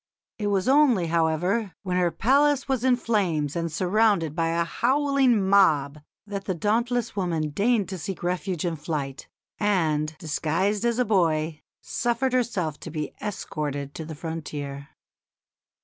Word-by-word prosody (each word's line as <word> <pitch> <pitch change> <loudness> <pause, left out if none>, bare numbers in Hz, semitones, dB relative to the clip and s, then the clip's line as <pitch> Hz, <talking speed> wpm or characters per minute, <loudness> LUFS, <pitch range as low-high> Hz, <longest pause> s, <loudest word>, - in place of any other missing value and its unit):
It 210 - -1
was 200 0 +1
only, 265 - +4
however, 175 +5 +1
when 180 -2 -2
her 180 -1 +3
palace 275 - +2
was 265 -3 0
in 260 -1 +4
flames 180 - 0
and 170 -1 -2
surrounded 185 -2 +2
by 165 -1 +1
a 170 +1 +1
howling 260 0 +2
mob 155 -8 +3 0.3
that 200 -1 -5
the 185 - -1
dauntless 230 +5 0
woman 165 -6 -1
deigned 210 +5 +1
to 190 -2 -5
seek 185 +3 -5
refuge 180 -1 -2
in 170 -2 -1
flight, 145 -3 -4 0.3
and, 160 -7 +1
disguised 170 +8 -1
as 235 -1 +1
a 250 - +2
boy, 160 -6 +1 0.2
suffered 240 +2 -1
herself 200 - -1
to - - -8
be 155 -2 -4
escorted 145 -8 -4
to 160 - -6
the 155 0 -7
frontier. 145 -3 -6
180 Hz, 150 wpm, -25 LUFS, 155-225 Hz, 0.3 s, only